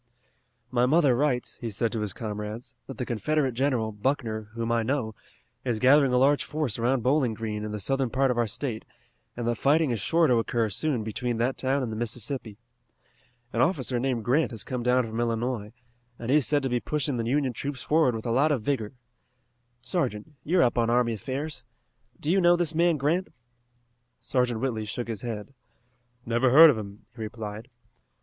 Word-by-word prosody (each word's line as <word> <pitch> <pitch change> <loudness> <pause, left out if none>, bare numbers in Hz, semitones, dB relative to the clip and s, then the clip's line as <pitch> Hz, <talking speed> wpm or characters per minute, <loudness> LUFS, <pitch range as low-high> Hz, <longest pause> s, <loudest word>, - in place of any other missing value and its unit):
"My 125 0 +3
mother 145 -3 +4
writes," 130 -2 0
he 115 - -5
said 110 +2 -1
to 115 - -3
his 105 -2 -1
comrades, 105 +2 -6
"that 135 - -8
the 125 - -3
Confederate 135 +4 0
general, 125 -3 0
Buckner, 110 -1 -2
whom 115 0 -2
I 115 0 +2
know, 115 -2 -1 0.5
is 120 -3 -1
gathering 135 +3 +5
a 125 - +3
large 140 +3 +4
force 150 -8 -2
around 120 +1 +1
Bowling 130 -3 +2
Green 105 -1 -4
in 105 - -4
the 105 - -4
southern 135 +5 0
part 135 +2 +2
of 120 - -2
our 120 - +2
state, 110 +1 -4 0.5
and 120 -1 -3
that 120 -1 -1
fighting 150 0 +3
is 115 - -1
sure 165 - +2
to 125 -5 +3
occur 115 -1 0
soon 135 -2 -1
between 115 +2 -3
that 120 +3 0
town 135 +1 0
and 115 - -3
the - - -4
Mississippi. 115 0 -4 1.0
An 115 - +1
officer 130 -5 +1
named 120 -3 -1
Grant 140 +3 +2
has 115 -4 -6
come 125 -1 -4
down 125 +1 +2
from 115 0 -5
Illinois, 115 -2 -1 0.5
and 120 +2 -3
he 145 - +6
is 145 - +2
said 145 -2 +2
to 135 - 0
be 125 0 +1
pushing 145 -1 -2
the 115 - -2
Union 135 -1 +1
troops 135 0 -5
forward 150 -5 +3
with 110 - -6
a 115 - -1
lot 140 +6 +3
of 130 -7 0
vigor. 120 -3 -2 0.9
Sergeant, 130 - -2
you 175 +5 +1
are - - +6
up 120 0 +2
on 115 0 +2
army 120 -1 +2
affairs. 135 +6 -4 0.6
Do 150 - -1
you 195 +1 +3
know 175 0 +6
this 170 -2 -1
man 170 0 +3
Grant?" 160 +7 0 0.9
Sergeant 125 -3 0
Whitley 115 -5 -2
shook 120 +3 -4
his 110 -4 -4
head. 115 +1 -6 0.7
"Never 120 +2 +2
heard 155 +5 +9
of 125 - -3
him," 100 0 -9
he 115 - -9
replied. 110 +1 -6
125 Hz, 200 wpm, -27 LUFS, 115-140 Hz, 1.0 s, heard